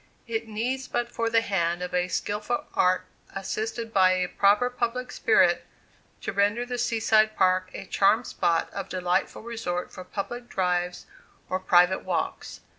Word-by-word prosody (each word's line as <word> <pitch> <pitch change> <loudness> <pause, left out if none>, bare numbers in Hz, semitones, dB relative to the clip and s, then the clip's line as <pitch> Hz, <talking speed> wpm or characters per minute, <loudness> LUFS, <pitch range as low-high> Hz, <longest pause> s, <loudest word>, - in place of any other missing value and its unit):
It 230 -1 -3
needs 250 +5 -2
but 240 0 -2
the 230 0 +2
hand 175 -4 -1
of 180 - -5 0.2
skilful 210 +6 -2
art, 185 0 +2 0.3
assisted 220 +4 -4
by 185 -1 +5
a 185 -1 0
proper 200 +6 +3
public 250 +1 -2
spirit, 185 -5 +3 0.6
to - - -4
render 205 +4 +1
the 245 0 -4
Sea 230 -1 0
side 215 0 +3
Park 185 0 +2
a - - -6
charmed 220 +5 +3
spot 165 -1 0
of 195 -1 -5
delightful 180 +2 -1
resort 220 -7 -4
for 185 - -9
public 240 +6 -6
drives 180 -1 -1 0.4
or 185 - 0
private 180 0 +4
walks. - - -3
200 Hz, 150 wpm, -26 LUFS, 185-230 Hz, 0.6 s, by